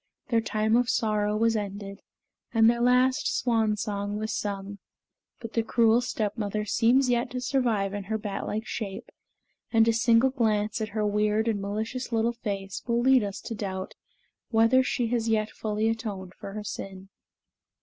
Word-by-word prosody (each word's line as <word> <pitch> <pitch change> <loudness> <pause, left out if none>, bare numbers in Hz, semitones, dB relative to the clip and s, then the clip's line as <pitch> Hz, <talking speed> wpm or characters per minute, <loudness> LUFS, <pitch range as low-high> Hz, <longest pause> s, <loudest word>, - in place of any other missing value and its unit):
Their 230 -2 +3
time 220 0 +1
of 245 0 +2
sorrow 210 -3 +1
was 230 +1 +2
ended 200 -1 -5 0.5
and 225 -1 +5
their 235 +1 +3
last 250 +1 +3
swan 225 -3 +1
song 205 0 -3
was 220 +1 -3
sung; 200 0 -4 0.6
but 230 -1 -8
the 230 - +2
cruel 230 +1 +3
stepmother 210 -3 -2
seems 245 +5 +3
yet 240 +1 +1
to 250 - -4
survive 235 -7 0
in 205 -1 -4
her 220 +2 -1
bat 205 -2 -4
like 220 +2 -3
shape, 200 -6 -5 0.6
and 225 -1 +4
a 230 - +4
single 235 +2 +4
glance 220 -3 0
at 215 - -2
her 210 - +1
weird 210 +2 +1
and 215 -3 0
malicious 220 +6 -4
little 230 +1 +1
face 200 -4 -5
will 235 0 +1
lead 260 -1 +4
us 200 0 -4
to 230 - -6
doubt 190 -3 -5 0.6
whether 230 +3 +4
she 255 -1 -1
has 230 -1 0
yet 215 -1 +1
fully 215 0 -1
atoned 210 -5 -3
for 195 - -9
her 215 0 -5
sin. 195 -1 -7
220 Hz, 170 wpm, -27 LUFS, 205-235 Hz, 0.6 s, and